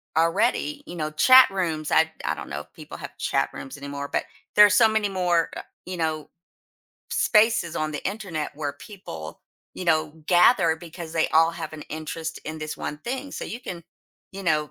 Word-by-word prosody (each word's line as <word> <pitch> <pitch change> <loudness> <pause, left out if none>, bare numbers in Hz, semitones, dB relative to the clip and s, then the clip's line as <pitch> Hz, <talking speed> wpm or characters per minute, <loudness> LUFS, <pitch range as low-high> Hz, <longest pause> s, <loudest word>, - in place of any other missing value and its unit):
already, 160 -2 +1
you 175 - -8
know, 155 -2 -2
chat 255 +11 +7
rooms, 165 -6 -2
I 160 0 +4
I - - 0
don't - - -8
know - - -4
if - - -18
people - - -10
have - - -9
chat - - 0
rooms 135 - -8
anymore, 140 0 -6
but - - 0 0.3
there 210 - +10
are - - +5
so 215 +3 +6
many 220 -2 +1
more, 175 -3 +1
uh - - -4 0.3
you 185 - -4
know, 155 -2 -2 0.8
spaces 215 -6 +3
on 155 0 -1
the 145 - -4
internet 190 -7 -3
where 145 -1 -3
people, 80 - -9 0.3
you 185 - -6
know, 155 -2 +2 0.2
gather 175 -2 +5
because 165 0 -9
they 160 -1 +1
all 165 +1 +4
have - - -6
an 155 -1 -8
interest 160 +1 -5
in 155 +1 -5
this 155 0 -5
one 150 - -5
thing. 265 - -5
So - - -5
you 235 - -6
can, 175 -8 -7 0.5
you 195 0 -7
know 150 -5 +1
165 Hz, 195 wpm, -25 LUFS, 155-190 Hz, 0.8 s, there